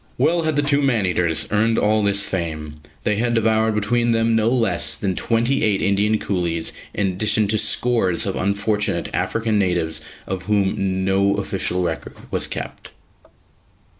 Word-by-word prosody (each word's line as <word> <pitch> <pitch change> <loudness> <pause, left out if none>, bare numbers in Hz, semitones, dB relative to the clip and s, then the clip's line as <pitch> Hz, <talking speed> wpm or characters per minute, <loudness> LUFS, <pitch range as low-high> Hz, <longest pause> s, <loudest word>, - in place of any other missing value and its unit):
Well 170 0 +2
had 155 -2 -1
the 145 - +2
two 145 0 +2
man 120 -8 +2
eaters 85 -3 0
earned 110 +2 +2
all 110 +1 +2
this 100 0 +1
fame; 80 -4 -4 0.3
they 105 - +1
had 120 +1 0
devoured 110 -1 +2
between 120 +3 +1
them 115 0 +2
no 110 0 +2
less 120 -2 +1
than 95 -3 -2
twenty 120 +7 0
eight 105 -3 +2
Indian 105 +1 +2
coolies, 85 -5 -2 0.2
in 100 - -1
addition 105 +3 +1
to 110 0 +2
scores 115 -9 +1
of - - -2
unfortunate 100 -1 -1
African 110 +3 0
natives 85 -4 -1 0.2
of 95 -1 -5
whom 95 -2 0
no 100 +1 +2
official 95 -2 -2
record 80 -3 -4 0.2
was - - -1
kept. - - -6
105 Hz, 160 wpm, -21 LUFS, 95-115 Hz, 0.3 s, Well